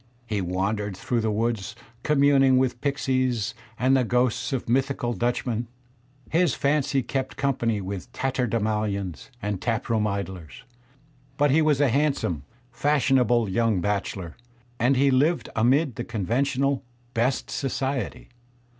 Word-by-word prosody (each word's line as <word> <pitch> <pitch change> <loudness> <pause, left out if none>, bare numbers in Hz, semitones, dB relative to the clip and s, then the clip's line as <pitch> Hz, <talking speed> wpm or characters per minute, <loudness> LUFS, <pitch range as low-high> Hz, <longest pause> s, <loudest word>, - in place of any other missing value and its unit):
He 105 -4 -2
wandered 95 +2 -2
through 120 +3 -1
the 110 - 0
woods 110 -2 -1 0.3
communing 140 -2 +4
with 125 -2 0
pixies 130 -5 0 0.2
and 130 +2 +3
the 130 - +3
ghosts 125 +1 +1
of 130 -3 -2
mythical 130 0 0
Dutchmen; 120 -1 -1 0.6
his 170 -4 +3
fancy 140 -2 +1
kept 135 +1 -3
company 120 -6 0
with 95 +4 -6
tatterdemalions 110 - -1
and 100 -2 -2
tap 115 -2 -1
room 110 -2 +2
idlers; 95 - -5 0.7
but 145 -1 +3
he 160 +4 +4
was 150 -3 +3
a 145 -2 +4
handsome, 135 - 0 0.3
fashionable 125 -4 +2
young 110 0 +1
bachelor, 95 -3 -2 0.4
and 125 +3 +3
he 140 +1 +4
Kved 150 +6 +2
amid 130 +4 +2
the 120 - -2
conventional 130 +6 0 0.3
"best 125 +3 0
society." 135 -2 -3
120 Hz, 130 wpm, -25 LUFS, 105-135 Hz, 0.7 s, communing